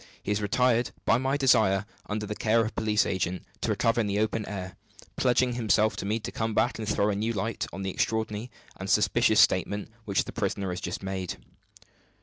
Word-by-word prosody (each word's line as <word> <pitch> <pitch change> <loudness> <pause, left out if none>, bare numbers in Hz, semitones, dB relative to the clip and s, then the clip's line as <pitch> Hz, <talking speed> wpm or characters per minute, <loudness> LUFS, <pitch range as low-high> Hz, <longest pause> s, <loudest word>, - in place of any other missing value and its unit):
He - - -2
has 105 +1 0
retired 120 +3 +2 0.2
by 115 - +4
my 135 +2 0
desire, 110 -8 +3 0.2
under 105 0 -2
the 105 - -4
care 110 +2 +2
of 110 - 0
a - - -16
police 110 -1 +1
agent, 95 -1 -2 0.2
to - - -1
recover 115 +1 +2
in 105 - -1
the 100 0 -1
open 110 0 0
air; 95 -3 -6 0.4
pledging 125 0 +2
himself 110 -2 +2
to 100 - -4
me 110 +3 0
to - - -5
come 110 -1 -2
back 120 - +1
and 110 - -3
throw 105 +1 +2
a - - -1
new 110 +3 -1
light 110 +2 -2
on 95 +2 -6
the 95 - -2
extraordinary 110 +3 -1 0.3
and 95 +1 -6
suspicious - - +3
statement 100 +2 +2
which 100 -3 +1
the - - -8
prisoner 95 -2 -2
has 90 0 -5
just 95 - -4
made. 95 -2 -3
105 Hz, 210 wpm, -27 LUFS, 100-115 Hz, 0.4 s, by